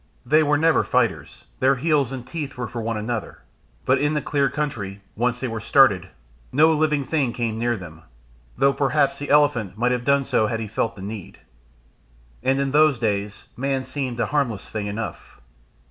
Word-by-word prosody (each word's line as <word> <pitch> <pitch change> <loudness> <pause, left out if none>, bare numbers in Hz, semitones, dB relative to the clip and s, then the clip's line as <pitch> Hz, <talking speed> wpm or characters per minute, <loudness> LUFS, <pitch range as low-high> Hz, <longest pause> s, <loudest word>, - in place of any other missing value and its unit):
They 155 +2 +4
were 145 -1 +2
never 160 +1 +3
fighters; - - -1
their 135 +1 +4
heels 140 -2 +1
and 130 -2 -6
teeth 145 -4 -6
were 120 -2 -3
for 120 - -5
one 115 0 -2
another, 110 +1 -4 0.4
but 130 - +3
in 145 +1 +1
the - - +2
clear 140 -2 +1
country, 105 -10 -4
once 120 +2 0
they 130 - -2
were 115 -1 -4
started, 115 -4 +4 0.4
no 155 +4 +5
living 150 -2 +1
thing 135 -4 0
came 115 -2 -2
near 120 0 0
them, 80 -4 -11 0.6
though 140 0 +4
perhaps 140 0 +1
the 145 - -5
elephant 120 -10 +2
might 125 +2 +1
have 125 -1 -1
done 140 +1 +2
so 110 - +2
had 115 +1 -2
he 110 - -3
felt 110 +2 -2
the 95 - -9
need. 105 -1 -7 1.0
And 135 +1 +1
in 140 -1 0
those 150 -1 +4
days 105 -2 -2
man 135 +1 -1
seemed 130 -4 -4
a 115 - +2
harmless 125 -7 -1
thing 105 -2 -4
enough. 105 +3 -6
125 Hz, 190 wpm, -23 LUFS, 110-145 Hz, 1.0 s, no